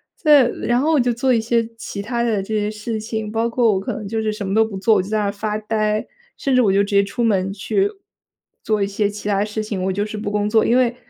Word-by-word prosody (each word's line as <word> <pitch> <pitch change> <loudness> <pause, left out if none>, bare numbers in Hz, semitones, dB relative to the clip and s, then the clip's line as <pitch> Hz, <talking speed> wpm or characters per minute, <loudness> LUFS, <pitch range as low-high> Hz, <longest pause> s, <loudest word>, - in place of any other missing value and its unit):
再 295 -5 +5
再 - - -2
然 240 +1 0
后 315 +2 +2
我 295 - +4
就 245 -1 +2
做 255 +2 +1
一 225 - +2
些 230 0 +1
其 200 -2 -6
它 235 +2 -2
的 215 -4 0
这 215 +3 -4
些 210 0 0
事 220 +1 -4
情， 220 -1 -4
包 230 +1 0
括 230 -3 +2
我 190 - 0
可 195 - -4
能 210 -2 -6
就 220 +1 -2
是 215 -1 0
什 205 -2 -5
么 195 - -1
都 225 - +5
不 200 -3 -6
做， 220 +2 +3
我 190 - +3
就 190 - -8
在 215 - 0
那 210 - 0
儿 200 - 0
发 210 +1 -3
呆， 215 0 -1 0.3
甚 270 -2 0
至 255 - +5
我 200 -4 +3
就 200 - +4
直 205 - -5
接 200 - +5
出 235 +5 -3
门 195 -4 +1
去 390 - 0 0.7
做 215 -2 0
一 200 - +1
些 200 +1 0
其 210 0 -7
它 200 0 +2
事 215 0 -4
情， 200 -4 -4
我 190 - 0
就 205 +2 -1
是 215 0 -6
不 205 -1 -4
工 210 0 0
作。 220 0 +3
因 245 - +3
为 245 -1 +2
215 Hz, 320 characters per minute, -20 LUFS, 205-235 Hz, 0.7 s, 再